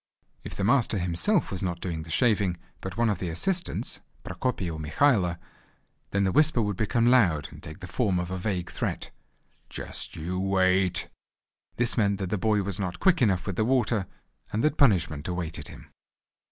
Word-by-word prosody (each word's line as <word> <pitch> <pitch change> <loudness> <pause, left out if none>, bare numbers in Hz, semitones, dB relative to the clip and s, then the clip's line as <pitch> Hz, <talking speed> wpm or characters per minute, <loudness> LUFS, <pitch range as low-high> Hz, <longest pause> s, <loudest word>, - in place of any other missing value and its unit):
If - - -7
the 100 - -3
master 115 0 +3
himself 90 - +1
was 95 - -3
not 90 -3 -2
doing 85 -4 -4
the 80 - -10
shaving 100 -2 +2 0.2
but 95 -1 -7
one 120 0 +3
of 105 - 0
the 90 - -3
assistants, 175 - -1 0.2
Prokopy 125 -8 -2
or 80 -2 -4
Mikhailo, 90 - +2 0.7
then 100 0 +1
the 95 - +2
whisper 150 +2 +3
would 105 -3 0
become 115 +4 +1
loud, 100 - +3
and - - -12
take 80 - -10
the 95 - -7
form 100 -3 0
of 90 0 -3
a 95 - -2
vague 90 -3 -2
threat: - - -3 0.6
"Just - - 0
you 90 +4 -3
wait!" 95 -2 +2 0.7
This 120 +1 0
meant 100 -2 +2
that 95 -3 -4
the 105 - 0
boy 105 0 +2
was 100 -1 -3
not 90 -2 -3
quick 185 -5 +3
enough 95 -7 +2
with 100 -4 -4
the 110 - +2
water, 115 -5 +1 0.4
and 110 +4 -1
that 150 0 +2
punishment 85 - +2
awaited 80 -4 -4
him. - - -13
95 Hz, 185 wpm, -27 LUFS, 90-115 Hz, 0.7 s, master